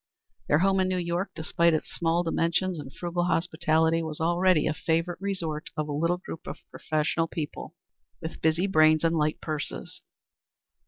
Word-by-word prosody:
Their 150 - +4
home 190 +3 +3
in 185 - +2
New 185 0 0
York, 175 +2 -1
despite 170 +1 +2
its 155 - -3
small 170 0 +1
dimensions 170 +1 0
and 135 -2 -8
frugal 175 +2 -2
hospitality, 165 -1 +2
was 160 -2 -4
already 175 0 +3
a 155 - +1
favorite 165 +3 -1
resort 170 -6 -3
of 155 0 -1
a - - -4
little 170 +4 +1
group 175 -2 -9
of - - -5
professional 155 +1 0
people 160 +1 -6 0.4
with 160 0 -7
busy 160 +3 +2
brains 155 -4 +4
and 165 0 +2
light 155 -1 +1
purses. 155 -2 -5
165 Hz, 165 wpm, -27 LUFS, 155-175 Hz, 0.4 s, Their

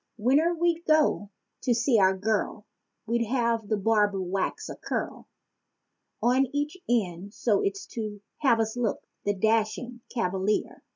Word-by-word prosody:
Whene'er 285 +10 +3
we'd 340 0 +1
go 310 -10 +3 0.3
to 245 -3 +2
see 235 0 +3
our 190 0 +4
girl, 210 +1 -1 0.4
we'd 235 +1 +1
have 230 -3 0
the 215 - +1
barber 205 -1 +2
wax 185 +1 -2
a - - -6
curl - - -4 1.0
On 255 +3 +4
each 290 +3 -2
end 200 -4 -1
so's 200 -3 0
to 215 -3 -4 0.2
have 260 -6 +4
us 220 0 0
look, 240 -4 -1 0.2
the 205 0 +1
dashing 225 +4 0
cavalier. 195 -2 -1
225 Hz, 135 wpm, -27 LUFS, 205-250 Hz, 1.0 s, our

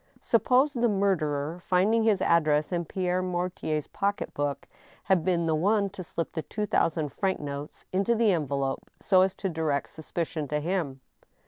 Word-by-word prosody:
Suppose 265 +3 +3
the 240 -2 +2
murderer, 170 -6 0
finding 195 +6 +2
his 215 -4 +2
address 155 -2 +3
in 175 -1 -1
Pierre 185 0 -1
Mortier's 175 -4 -2
pocket 200 0 -2
book, 145 -1 -2 0.4
had 185 -4 +2
been 170 -1 +1
the 160 - +1
one 200 +5 +2
to 185 -1 -7
slip 165 0 -4
the 160 - -3
two 210 +6 -3
thousand 160 -6 +1
franc 190 +6 -1
notes 145 0 -7
into 200 +5 +2
the 225 -2 +3
envelope 140 -5 -1
so 185 -2 +4
as 190 0 +2
to 195 - -3
direct 160 -5 -1
suspicion 160 -1 -4
to 150 +2 -1
him 155 -5 -2
175 Hz, 165 wpm, -27 LUFS, 150-195 Hz, 0.4 s, so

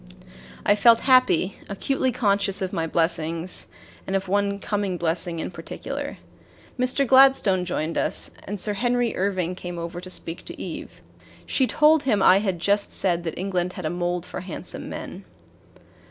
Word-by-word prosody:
I 205 - +6
felt 230 +2 +5
happy, 255 -8 +4
acutely 260 +6 0
conscious 200 -4 +1
of 185 - -3
my 165 -1 -1
blessings 165 +1 -1 0.4
and 195 - -1
of 195 0 -1
one 200 +1 +1
coming 200 -2 -2
blessing 170 0 -2
in - - -4
particular. - - -6 0.6
Mr. 255 +2 +1
Gladstone 260 -8 +5
joined 165 -2 -2
us, - - -1
and 205 0 -5
Sir 210 +3 0
Henry 245 +2 0
Irving 185 -2 0
came 175 -1 -7
over 170 +1 -5
to 185 - -9
speak 165 -2 -5
to - - -9
Eve. - - -7 0.4
She 260 - +1
told 305 +2 +4
him 220 -8 +1
I 190 - +7
had 195 -4 -1
just 200 +4 +1
said 175 -3 0
that 165 - -4
England 180 -1 -1
had 180 -5 -6
a 155 - -1
mold 175 0 -2
for - - -6
handsome 185 -1 -6
men. - - -7
190 Hz, 165 wpm, -24 LUFS, 175-210 Hz, 0.6 s, I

